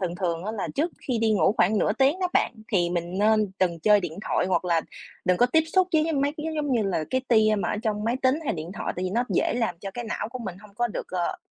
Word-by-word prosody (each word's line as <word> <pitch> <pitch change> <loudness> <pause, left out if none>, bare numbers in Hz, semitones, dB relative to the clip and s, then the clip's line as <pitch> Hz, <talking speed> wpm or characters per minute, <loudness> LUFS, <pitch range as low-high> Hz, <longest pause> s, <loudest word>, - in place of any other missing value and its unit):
thường 175 -2 -2
thường 170 -2 -2
á 215 - -3
là 210 -4 -3
trước 315 +5 0 0.2
khi 245 -3 +1
đi 225 -1 +2
ngủ 190 -3 +3
khoảng 205 +4 +3
nửa 210 - +2
tiếng 275 - +2
đó 365 - +1
bạn, - - +2 0.2
thì 175 -3 +2
mình 175 +2 -3
nên 215 -1 +3
đừng 170 -3 +1
chơi 210 +3 +5
điện 175 -1 -5
thoại - - +1
hoặc 185 -1 +1
là 170 -2 +2 0.4
đừng 180 0 +3
có 245 - +4
tiếp 320 +6 +3
xúc 375 -1 +4
với 315 - +4
với 320 +1 -1
mấy 285 +1 0
cái, 310 - -4
giống 290 -3 -1
như 230 - +2
là, 180 -6 -1
cái 260 - +1
tia 215 -2 +4
mà - - -1
ở - - -1
trong 210 -2 -1
máy 235 +3 +1
tính 260 0 +4
hay - - 0
điện 165 +2 -6
thoại, - - -3
tại 180 - -2
vì 185 - -2
nó 240 +4 +1
dễ - - +1
làm 220 -8 -1
cho 195 - -5
cái 240 +4 -6
não 215 0 -3
của 255 - -7
mình 190 -7 -6
hông 205 -1 -16
có 240 +2 +1
được, - - -5
ờ, 180 -2 -2
210 Hz, 295 wpm, -25 LUFS, 180-245 Hz, 0.4 s, chơi